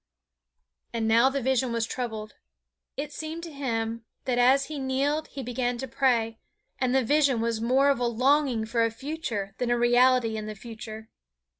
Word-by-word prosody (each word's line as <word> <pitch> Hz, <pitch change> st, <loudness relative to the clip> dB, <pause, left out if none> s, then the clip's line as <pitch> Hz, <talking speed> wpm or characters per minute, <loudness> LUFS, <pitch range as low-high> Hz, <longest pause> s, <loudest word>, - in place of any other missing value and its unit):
And 225 Hz, -1 st, -1 dB
now 230 Hz, +4 st, +5 dB
the 270 Hz, -1 st, -3 dB
vision 260 Hz, -1 st, +1 dB
was 230 Hz, -1 st, 0 dB
troubled. 220 Hz, -3 st, -5 dB, 0.6 s
It 290 Hz, +1 st, -4 dB
seemed 315 Hz, +2 st, -6 dB
to 335 Hz, -, -7 dB
him 230 Hz, -4 st, -2 dB, 0.2 s
that 250 Hz, -2 st, 0 dB
as 265 Hz, +3 st, +5 dB
he 305 Hz, -2 st, -6 dB
kneeled 275 Hz, +4 st, 0 dB
he 270 Hz, -, -7 dB
began 245 Hz, 0 st, -1 dB
to 265 Hz, -, -5 dB
pray, 230 Hz, -3 st, +1 dB, 0.4 s
and 255 Hz, 0 st, +1 dB
the 265 Hz, -, +4 dB
vision 280 Hz, -1 st, +3 dB
was 230 Hz, -1 st, -1 dB
more 265 Hz, +4 st, +4 dB
of 275 Hz, -, -1 dB
a 245 Hz, -, +1 dB
longing 255 Hz, 0 st, +2 dB
for 230 Hz, +1 st, +1 dB
a 230 Hz, -, +2 dB
future 230 Hz, -5 st, -4 dB
than 245 Hz, -, 0 dB
a 240 Hz, -, +2 dB
reality 240 Hz, -1 st, +4 dB
in 215 Hz, 0 st, -5 dB
the 215 Hz, -, -6 dB
future. 220 Hz, 0 st, -9 dB
245 Hz, 180 wpm, -27 LUFS, 230-270 Hz, 0.6 s, now